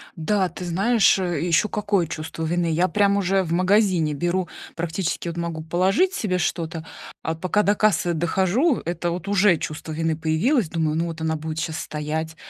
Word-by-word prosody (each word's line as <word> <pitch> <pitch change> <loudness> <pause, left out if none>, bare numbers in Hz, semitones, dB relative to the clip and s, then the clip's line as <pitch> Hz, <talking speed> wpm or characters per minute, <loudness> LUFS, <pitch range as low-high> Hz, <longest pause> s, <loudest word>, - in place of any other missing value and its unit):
Да, 185 +3 0
ты 180 +2 -8
знаешь, 195 +4 +3
э, 175 -3 -1
еще 170 +4 +2
какое 205 -5 0
чувство 155 +1 -5
вины! 170 +1 0
Я 175 +3 +2
прям 200 0 +2
уже 195 0 +2
в 165 - -6
магазине 185 -3 +2
беру, 175 +4 -1 0.3
практически, 170 +1 -2
вот 170 0 -4
могу 170 -2 -3
положить 190 - +2
себе 200 - -1
что-то, 165 -1 -2 0.4
а 160 - -2
пока 185 +5 +1
до 205 +1 +3
кассы 205 -5 +2
дохожу, 190 - +1
это, 175 0 -2
вот, 180 +3 -5
уже 200 -3 +4
чувство 155 +1 -6
вины 160 0 -1
появилось. 165 - +1
Думаю: 160 -2 -1
ну 165 - 0
вот 165 -1 -6
она 160 0 0
будет 155 0 -4
щас 160 -1 -3
стоять, 155 +1 -4
175 Hz, 185 wpm, -23 LUFS, 160-195 Hz, 0.4 s, уже